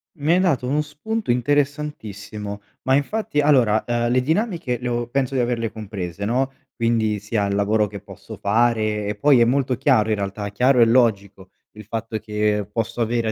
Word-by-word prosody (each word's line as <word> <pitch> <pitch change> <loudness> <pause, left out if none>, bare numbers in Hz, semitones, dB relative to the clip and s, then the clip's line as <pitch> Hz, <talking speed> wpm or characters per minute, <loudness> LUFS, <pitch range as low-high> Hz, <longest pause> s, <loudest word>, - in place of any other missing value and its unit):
Mi 155 +2 +1
hai 180 - +4
dato 145 -10 +1
uno 150 +3 +1
spunto 210 +10 -5
interessantissimo. 120 -7 -2 0.2
Ma 130 0 +2
infatti 150 +2 -1
allora, 125 -7 +3
ehm, 120 0 0
le 130 0 +3
dinamiche 165 - -1
le 125 - -3
ho 120 0 -2
penso 135 +1 -1
di - - +1
averle 115 -3 -1
comprese, 100 -3 -6
no. 130 +5 0 0.2
Quindi 115 -3 0
sia 105 0 -1
il 100 0 -1
lavoro 105 +1 +2
che 100 0 -8
posso - - -11
fare, 110 -1 +1
e 105 - -2
poi 135 +4 +4
è 115 - +5
molto 130 +1 +1
chiaro 125 -5 +3
in 110 - +2
realtà, 100 0 -4
chiaro 125 +5 +2
e 115 - +7
logico 100 -5 +1 0.2
il 105 -1 -12
fatto 110 0 -4
che 105 -1 -1
posso 115 +2 -2
avere 115 0 0
a - - 0
115 Hz, 190 wpm, -22 LUFS, 105-135 Hz, 0.2 s, e